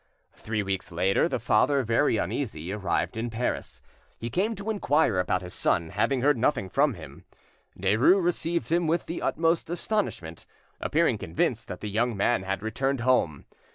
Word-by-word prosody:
Three 110 -1 -3
weeks 95 -2 -3
later, 95 - +2
the - - -1
father, 125 +5 +2
very 115 +2 +2
uneasy, 95 - -3
arrived 105 +1 -1
in 115 +2 -2
Paris. 115 +2 -3 0.3
He 115 +1 -5
came 210 - 0
to 200 +2 -3
inquire 150 - +2
about 90 0 0
his 90 - -8
son, 85 -5 0
having 125 +5 0
heard 145 -3 +3
nothing 110 -6 +1
from 140 +4 +2
him. 90 - -12 0.5
Derues 110 - +4
received 170 -1 -1
him 170 0 +2
with 165 +2 0
the 170 - -5
utmost 165 +1 +1
astonishment, 175 - -2 0.3
appearing - - +1
convinced - - -1
that - - -7
the 105 - -4
young 115 +1 0
man 110 +2 +2
had 95 +2 -3
returned 135 +4 -1
home. 120 - +1
120 Hz, 165 wpm, -27 LUFS, 100-155 Hz, 0.5 s, Derues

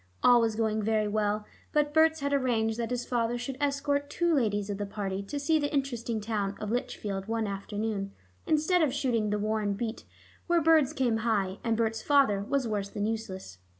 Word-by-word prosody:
All 245 -1 +7
was 225 -1 +1
going 220 -1 0
very 215 0 +1
well, 210 0 0 0.3
but 295 -1 +2
Berts 320 0 +4
had 280 0 0
arranged 230 -4 +1
that 230 - -2
his 245 -1 -2
father 240 -1 0
should 245 +2 -4
escort 285 0 0
two 345 +1 +1
ladies 205 -7 +1
of 200 - -4
the 205 - -2
party 200 -1 -3
to 285 +9 -5
see 310 +3 +2
the 290 -1 -1
interesting 240 -5 -1
town 205 -2 -2
of 210 0 -4
Lichfield 205 -5 -3
one 225 0 -1
afternoon, 200 0 -3 0.4
instead 315 +4 +3
of 285 -4 +2
shooting 230 -6 0
the 210 - 0
Warren 210 -1 0
beat, 225 +2 -4 0.4
where 345 -1 +4
birds 315 -3 +4
came 255 -7 +1
high 205 -4 0
and 230 -2 +1
Berts' 225 -1 0
father 275 -9 +3
was 260 +5 -1
worse 205 -2 -2
than 205 0 -3
useless. 190 - -5
225 Hz, 195 wpm, -29 LUFS, 210-275 Hz, 0.4 s, All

